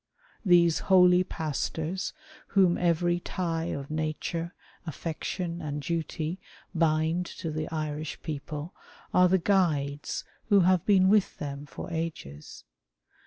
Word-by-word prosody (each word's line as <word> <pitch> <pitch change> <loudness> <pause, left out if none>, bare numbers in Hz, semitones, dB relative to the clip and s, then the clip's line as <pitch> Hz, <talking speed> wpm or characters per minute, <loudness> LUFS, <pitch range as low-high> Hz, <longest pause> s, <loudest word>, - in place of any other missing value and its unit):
These 175 -4 +5
holy 180 -1 +6
pastors, 160 +2 -3 0.4
whom 185 -3 +4
every 175 0 +1
tie 165 -2 -2
of 140 -4 -4
nature, 160 +2 -3 0.3
affection, 170 +2 -4
and 150 -2 -3
duty, 165 +1 -3 0.3
bind 165 +1 +1
to 165 - -4
the 155 0 -3
Irish 155 -1 -4
people, 150 +1 -5 0.4
are 180 0 +6
the 190 - +4
guides 155 -7 0 0.3
who 200 -2 +6
have 180 -1 +3
been 190 -2 +5
with 205 0 +3
them 145 0 -6
for 170 - -8
ages. 160 - -5
165 Hz, 120 wpm, -28 LUFS, 155-180 Hz, 0.4 s, holy